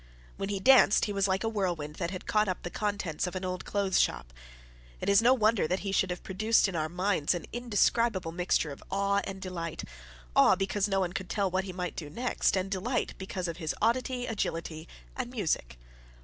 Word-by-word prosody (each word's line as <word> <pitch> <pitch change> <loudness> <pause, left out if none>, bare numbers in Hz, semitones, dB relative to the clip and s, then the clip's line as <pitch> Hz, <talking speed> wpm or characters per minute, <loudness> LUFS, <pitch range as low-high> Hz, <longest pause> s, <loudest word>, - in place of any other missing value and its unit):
When 195 - -3
he 200 -1 -1
danced, 250 -1 +6
he 205 - -3
was 200 0 +1
like 190 0 0
a - - 0
whirlwind 175 -8 -2
that 170 -2 -2
had 185 +1 -7
caught 210 0 +2
up 185 - -3
the 175 - -5
contents 200 -6 -2
of 180 - -6
an 185 0 -3
old 180 0 -4
clothes 200 -2 +1
shop. - - 0 0.7
It - - -2
is 200 +1 +6
no 240 +2 +5
wonder 215 -6 +2
that 185 +3 -1
he 195 - -3
should 190 -1 +2
have 180 0 -5
produced 215 +4 +2
in 190 - -4
our 155 -1 -1
minds 180 -2 +1
an 170 - -5
indescribable 230 -5 +1
mixture 170 -3 0
of 140 - -9
awe 200 +1 +1
and 190 0 -6
delight 170 -4 -5 0.5
awe, - - +6
because 195 +2 0
no 195 -1 +1
one 180 -2 -1
could 185 -2 -5
tell 200 -3 0
what 190 +1 0
he 190 - -5
might 180 -1 -4
do 150 -3 -6
next, 240 +3 0
and 190 +1 -2
delight 230 +6 -1
because 190 -1 -4
of 170 - -5
his 160 -3 -3
oddity, 245 +2 0
agility, 165 -7 -3 0.3
and 255 -2 -3
music. 160 - -2
190 Hz, 215 wpm, -29 LUFS, 175-210 Hz, 0.7 s, danced